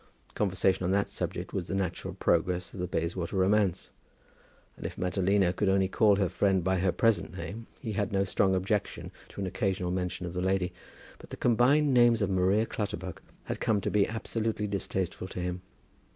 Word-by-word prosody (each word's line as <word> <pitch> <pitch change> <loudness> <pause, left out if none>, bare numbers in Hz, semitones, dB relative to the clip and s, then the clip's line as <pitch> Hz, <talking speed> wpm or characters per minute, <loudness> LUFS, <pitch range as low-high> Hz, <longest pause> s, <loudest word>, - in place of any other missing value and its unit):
Conversation 95 -2 +1
on 90 - 0
that 100 0 +1
subject - - -4
was 90 -3 -2
the 95 - -2
natural 95 -1 -3
progress 90 +1 0
of - - -8
the 90 - -2
Bayswater 85 +2 -2
romance. 95 -1 +2 0.8
And - - -11
if - - -4
Madalina 95 0 +2
would 105 - +2
only 95 0 +3
call 105 +1 +4
her 100 -1 +1
friend 95 +1 +1
by 95 0 +1
her 95 0 +2
present 100 -4 +1
name, 105 +7 -6
he 115 -6 -4
had 100 -1 -1
no 100 0 +2
strong 95 0 +2
objection 95 +2 -2 0.2
to - - -7
an - - -1
occasional 95 -2 -1
mention 90 0 -2
of 85 - -5
the 90 - -2
lady; 95 -1 0 0.5
but - - -13
the - - -7
combined 135 +5 +3
names 120 -3 +5
of 100 - 0
Maria 95 +4 +3
Clutterbuck 95 -5 -5 0.2
had - - -4
come 105 -2 +2
to - - -2
be 105 -1 +3
absolutely 110 -1 -2
distasteful 95 -2 -3
to 90 - -7
him. 90 0 -3
95 Hz, 190 wpm, -29 LUFS, 90-105 Hz, 0.8 s, names